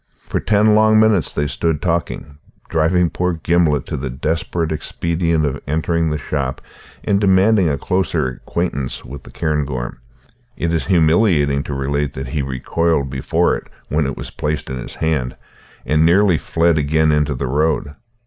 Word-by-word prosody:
For - - -1
ten 105 0 +3
long 110 0 +5
minutes 110 -7 +3
they 75 - -1
stood 80 +1 -1
talking, 80 -4 -3 0.3
driving 85 +2 +2
poor 90 0 -1
Gimblet 80 -4 +1
to - - -4
the 65 0 -4
desperate 80 +5 -2
expedient 80 +1 -1
of 70 0 -3
entering 80 +2 0
the 75 - -1
shop 70 -3 -3 0.4
and 100 0 +1
demanding 95 -1 +4
a 70 - 0
closer 90 -2 0
acquaintance 70 0 -3
with 70 +2 -8
the - - -14
cairngorm. 70 -7 -2 0.6
It 85 0 -1
is 80 - -1
humiliating 80 -5 +3
to 70 - -4
relate 70 +1 -1
that 65 -1 -6
he 75 +2 -1
recoiled 70 +2 -1
before 65 -1 +1
it - - -8 0.2
when 75 -1 +1
it 70 - -4
was - - -7
placed 75 -2 -3
in 65 - -4
his - - -8
hand, 75 -6 -1 0.5
and 75 +1 +2
nearly 90 0 +4
fled 80 +3 +1
again 80 +2 +2
into 75 -1 +1
the 65 - -3
road. 75 +2 0
80 Hz, 165 wpm, -19 LUFS, 70-85 Hz, 0.6 s, long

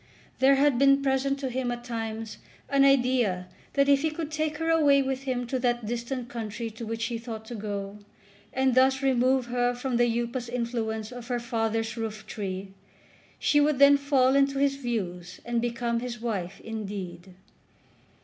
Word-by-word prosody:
There 270 +1 +6
had 275 -2 +3
been 275 0 +5
present 275 0 +1
to 265 - -1
him 250 0 -1
at 240 0 -5
times 225 -2 -5 0.3
an 275 -1 +4
idea 245 -9 +3 0.3
that 280 -1 +3
if 280 -1 +5
he 315 - +1
could 310 0 -5
take 310 0 -1
her 325 +1 -2
away 285 -4 +5
with 265 0 -3
him 250 -2 -1
to 255 +2 -2
that 240 -2 0
distant 240 +2 -3
country 230 -1 -5
to 225 +1 -8
which 225 +1 -3
he 230 -1 -3
thought 225 -2 -7
to 240 - -8
go, 205 -2 -5 0.5
and 265 0 +2
thus 265 +1 +4
remove 260 -1 +3
her 245 0 0
from 245 0 -2
the 240 0 +3
upas 240 0 -3
influence 230 -2 -3
of 245 -1 -8
her 245 -2 -1
father's 225 -1 -2
roof 215 -1 -5
tree, 195 -2 -5 0.7
she 290 - +3
would 295 -1 +2
then 280 +1 +8
fall 275 -2 +3
into 275 0 +3
his 275 0 +2
views 185 -9 -4
and 235 -1 0
become 235 -1 -1
his 240 0 -5
wife 195 -5 -3
indeed. 195 -5 -6
240 Hz, 180 wpm, -27 LUFS, 225-270 Hz, 0.7 s, then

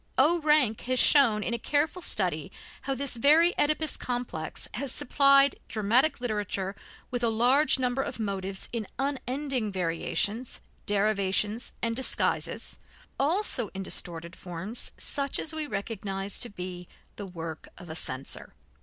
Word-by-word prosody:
O. 315 +6 +4
Rank 300 -8 +3
has 255 +1 0
shown 235 -6 +6
in 235 - -2
a 235 - -2
careful 300 +8 0
study - - -1 0.3
how 275 - -2
this 265 -2 0
very 315 +8 +5
Oedipus 305 +1 +1
complex 240 -11 -3
has 265 +2 -1
supplied 275 0 +4
dramatic 230 +8 +1
literature 205 -4 -3 0.4
with 245 -1 -3
a 235 - +3
large 250 +8 +4
number 255 0 0
of 270 - -5
motives 195 -2 -3
in 225 -4 -3
unending 270 -3 -2
variations, 195 +6 -1 0.3
derivations 205 +1 +1
and 230 -1 0
disguises, 260 +1 0 0.4
also 295 - +2
in 195 - -4
distorted 170 -1 -4
forms 185 +6 -6
such 280 -1 0
as 320 - -2
we 310 -1 -3
recognize 200 -3 -2
to 240 - 0
be 180 -2 -7 0.3
the 205 - -7
work 165 -3 -7
of 180 - -12
a 160 - -7
censor. 130 - -2
230 Hz, 140 wpm, -28 LUFS, 195-275 Hz, 0.4 s, shown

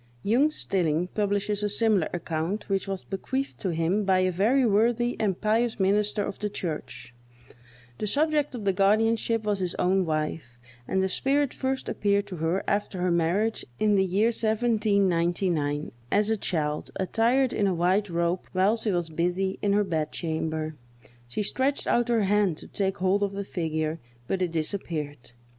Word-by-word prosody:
Jung 250 +9 +3
Stilling 180 - -1
publishes 205 0 -1
a 210 - 0
similar 205 -5 +2
account, 170 +4 -3
which 195 -1 0
was 195 -1 -4
bequeathed 260 +8 -4
to 190 - -2
him 170 +6 0
by 190 -1 +3
a 185 0 +2
very 230 +9 +3
worthy 235 +3 +2
and 195 -5 0
pious 225 +1 +1
minister 205 +2 +2
of 200 - -5
the 210 - -2
church. 155 -9 -6 0.9
The 210 - -2
subject 295 +2 +1
of 220 -4 -6
the 195 - +3
guardianship 220 +3 +2
was 205 -2 0
his 180 -2 -2
own 190 +1 +2
wife, 155 -5 -3 0.3
and 190 0 +1
the - - +2
spirit 275 +7 +1
first 265 0 -2
appeared 200 0 +1
to 180 - -6
her 165 +4 0
after 205 -2 -1
her 180 0 +1
marriage, 175 +7 +1
in 215 -1 +2
the 195 -1 +4
year 195 +5 +2
1799, 195 -9 +1 0.2
as 210 +2 +3
a - - +3
child, 150 -7 -2
attired 235 +7 +1
in 205 - +1
a 190 - +1
white 185 +4 +1
robe, 170 +1 -1
while 190 +4 +3
she 225 -1 -1
was 175 -2 0
busy 180 +4 -1
in 200 -1 +2
her 205 +1 +3
bed 160 -5 -2
chamber. 160 -1 -3 0.5
She 125 - -3
stretched 265 +7 0
out 240 0 +1
her 230 -3 +3
hand 200 -4 +2
to - - -9
take 195 -1 -1
hold 190 +2 +1
of 200 -1 0
the 200 0 -3
figure, 160 -3 -2 0.3
but 190 - -1
it 180 -2 0
disappeared. 155 -6 -3
195 Hz, 175 wpm, -26 LUFS, 170-215 Hz, 0.9 s, the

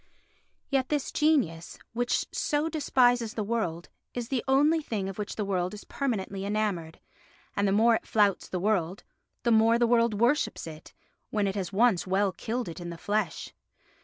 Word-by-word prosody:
Yet 265 -2 +1
this 295 -3 -1
genius, 255 - +1 0.2
which 245 +1 0
so 300 +1 0
despises 245 -7 +2
the 215 - -1
world, 200 -7 -2 0.3
is 240 -1 -4
the 260 -4 -1
only 295 +5 +4
thing 210 -9 -3
of 195 +1 -7
which 205 - -4
the 210 - -2
world 185 0 -1
is 210 - -10
permanently 200 -7 -3
enamoured, 200 -6 -2 0.6
and 200 0 +1
the - - +2
more 225 +3 +4
it - - -13
flouts 205 -3 +2
the 185 - -2
world, 190 -2 0 0.4
the 235 - +2
more 225 +1 +5
the 240 - +3
world 235 -2 +3
worships 245 +6 +1
it, 155 -1 -11 0.3
when 210 -2 0
it 195 - 0
has 190 -4 -3
once 205 -3 +3
well 195 +1 +2
killed 235 +6 -4
it 170 - -7
in 175 - -5
the 170 - -7
flesh. 205 -1 -2
215 Hz, 180 wpm, -28 LUFS, 190-245 Hz, 0.6 s, more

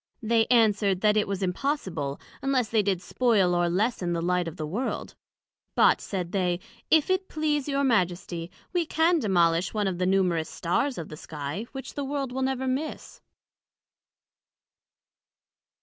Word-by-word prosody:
They 225 0 +3
answered, 205 -5 +3
That 210 -1 +4
it 210 - +2
was 195 0 -2
impossible, 185 - -2 0.2
unless 265 -4 +1
they 220 -2 +3
did 195 -2 -1
spoil 210 -8 +2
or 175 0 +2
lessen 185 -1 0
the 170 - -1
light 180 0 +1
of 165 +2 -7
the 155 - -3
World: 210 +12 -3 0.6
but, - - +5
said 180 -3 -4
they, 180 -3 0 0.3
if 315 +2 +4
it 375 0 0
please 300 -2 0
your 280 -1 0
Majesty, 180 -7 0 0.2
we 350 -1 +2
can 330 +2 +3
demolish 175 - +2
one 210 -1 +1
of 180 -2 -2
the 180 - +1
numerous 180 -4 +1
Stars 250 +10 -1
of 165 - -6
the 155 - -8
Sky, 150 +8 -5
which 270 -1 -7
the 285 - -3
World 275 -1 -3
will 265 +1 -3
never 265 0 -1
miss. 270 +5 -4
205 Hz, 160 wpm, -27 LUFS, 175-265 Hz, 0.6 s, but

